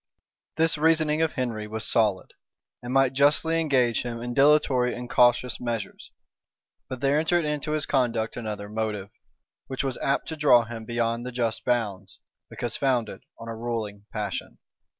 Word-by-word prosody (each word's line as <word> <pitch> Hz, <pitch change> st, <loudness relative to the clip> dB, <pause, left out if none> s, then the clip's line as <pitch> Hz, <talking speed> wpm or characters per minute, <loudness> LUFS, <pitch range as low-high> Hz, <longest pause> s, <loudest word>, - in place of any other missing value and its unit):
This 160 Hz, -1 st, +3 dB
reasoning 155 Hz, -1 st, +3 dB
of 160 Hz, -1 st, +1 dB
Henry 115 Hz, -5 st, -3 dB
was 110 Hz, 0 st, -4 dB
solid, 105 Hz, -4 st, +1 dB, 0.5 s
and 120 Hz, 0 st, -6 dB
might 135 Hz, 0 st, +3 dB
justly 150 Hz, +4 st, +3 dB
engage 130 Hz, -7 st, +2 dB
him 120 Hz, -1 st, -5 dB
in 120 Hz, +1 st, -4 dB
dilatory 135 Hz, -3 st, +3 dB
and 125 Hz, 0 st, -6 dB
cautious 120 Hz, 0 st, +3 dB
measures: 115 Hz, -5 st, -5 dB, 0.8 s
but 130 Hz, -1 st, -6 dB
there 140 Hz, +2 st, +3 dB
entered 165 Hz, +1 st, +1 dB
into 150 Hz, 0 st, -2 dB
his 155 Hz, -1 st, 0 dB
conduct 120 Hz, -5 st, 0 dB
another 105 Hz, -3 st, -5 dB
motive, 105 Hz, -2 st, -4 dB, 0.6 s
which 135 Hz, 0 st, -3 dB
was 135 Hz, -2 st, -3 dB
apt 135 Hz, -, 0 dB
to 160 Hz, -, -4 dB
draw 145 Hz, -6 st, +5 dB
him 115 Hz, 0 st, -8 dB
beyond 115 Hz, 0 st, -1 dB
the 125 Hz, -, -5 dB
just 115 Hz, -2 st, -2 dB
bounds, 100 Hz, -7 st, -2 dB, 0.3 s
because 120 Hz, -, -3 dB
founded 120 Hz, -8 st, -1 dB, 0.2 s
on 115 Hz, -, -10 dB
a 115 Hz, -, -5 dB
ruling 110 Hz, -3 st, -5 dB
passion. 105 Hz, -3 st, -4 dB
120 Hz, 160 wpm, -26 LUFS, 110-140 Hz, 0.8 s, draw